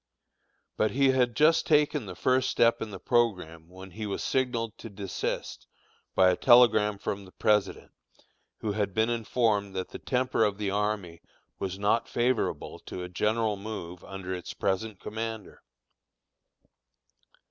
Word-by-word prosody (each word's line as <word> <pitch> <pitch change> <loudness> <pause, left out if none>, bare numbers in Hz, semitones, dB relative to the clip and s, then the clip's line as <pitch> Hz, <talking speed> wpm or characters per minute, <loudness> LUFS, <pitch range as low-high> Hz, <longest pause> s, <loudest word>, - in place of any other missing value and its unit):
But 110 - +2
he 135 +5 +3
had 125 -3 +1
just 155 +4 +4
taken 150 -5 +2
the 90 - -7
first 130 +6 +2
step 115 0 +3
in 110 - -3
the 95 -2 -8
programme 90 -9 0
when 95 +1 -11
he 105 +4 -5
was 100 - -3
signaled 120 -4 -1
to 115 - -8
desist 100 -2 -4 0.5
by 95 -1 +6
a - - +1
telegram 115 -4 +5
from 100 0 -4
the 95 - -14
President, 105 0 0 0.7
who 110 - -1
had 100 -2 -2
been 110 +2 +2
informed 110 -4 0
that 95 -1 -3
the - - -8
temper 130 -3 0
of 105 -2 +1
the 100 -2 -2
army 100 -5 -2 0.4
was 95 -1 -3
not 105 +3 +1
favorable 120 0 -1
to 90 - -5
a 90 - -6
general 105 +3 0
move 95 -4 -7
under 95 -1 -6
its 90 -1 -6
present 100 +1 -2
commander. 110 -1 -6
105 Hz, 150 wpm, -28 LUFS, 95-115 Hz, 0.7 s, by